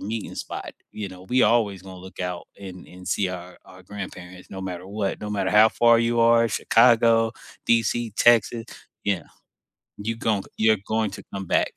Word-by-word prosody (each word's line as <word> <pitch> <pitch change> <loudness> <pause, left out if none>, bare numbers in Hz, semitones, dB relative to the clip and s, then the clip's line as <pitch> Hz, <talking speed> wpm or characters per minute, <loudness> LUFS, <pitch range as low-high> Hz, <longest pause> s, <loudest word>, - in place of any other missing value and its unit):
meeting 110 +2 -5
spot. - - -7 0.2
You 105 -2 -5
know, 90 -1 -12
we 125 +7 +1
always 105 -5 +2
gonna 95 0 -11
look 95 +1 -11
out 90 -1 -4
and 90 -2 -10
and 90 0 -11
see 100 -3 0
our 90 0 -8
our 95 0 -15
grandparents 90 -2 -9
no 95 - -7
matter 90 -1 -6
what, 100 0 -3
no 105 - -4
matter 95 -2 -1
how 110 +1 +6
far 115 -1 +4
you 115 0 +1
are- 115 0 +5
Chicago, 115 0 +4 0.3
DC, 115 0 +1
Texas- 115 0 +3 0.4
you 100 -1 +2
know, - - -13 0.7
you 110 +2 -3
goin 110 -3 0 0.2
you're 110 0 +4
going 110 -1 0
to - - -9
come 95 0 -4
back, - - +1
105 Hz, 185 wpm, -24 LUFS, 95-115 Hz, 0.7 s, how